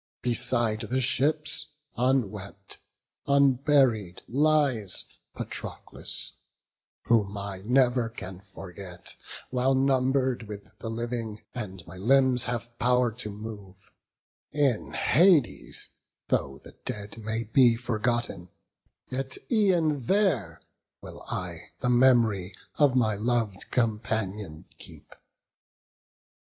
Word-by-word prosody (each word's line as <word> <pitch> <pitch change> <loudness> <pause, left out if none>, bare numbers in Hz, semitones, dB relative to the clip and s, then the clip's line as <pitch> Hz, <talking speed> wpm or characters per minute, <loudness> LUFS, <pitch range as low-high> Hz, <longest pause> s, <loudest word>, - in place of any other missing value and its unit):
Beside 120 -2 +1
the 130 +2 -1
ships, 150 +4 +1 0.3
unwept, 105 -6 -1 0.5
unburied, 135 -8 +3
lies 140 -7 +2 0.3
Patroclus: - - -4 0.7
whom 105 -3 +2
I 100 -1 -5
never 125 0 +3
can 95 -5 -8
forget, 90 -1 -8 0.4
While 130 +1 +2
number'd 130 -2 +1
with 105 -1 -8
the 115 - -5
living, 115 -2 -4
and 95 -8 -6
my 90 +3 -11
limbs 130 +4 +3
Have 120 0 -4
pow'r 125 0 +3
to 105 - -4
move; 100 -3 -10 0.6
in 140 -6 +1
Hades 170 -6 +3 0.4
though 70 0 0
the - - -11
dead 105 +2 -5
May 110 +1 -2
be 120 +1 +5
forgotten, 120 -5 -2 0.6
yet 130 +1 -4
e'en 170 - +2
there 160 - +1 0.4
will - - -10
I 90 -1 -5
The 125 - +1
mem'ry 120 -7 +3 0.2
of 145 -3 +5
my 110 -4 +3
lov'd 110 -1 -1
companion 105 -7 -2
keep. - - -11
120 Hz, 100 wpm, -27 LUFS, 105-130 Hz, 0.7 s, be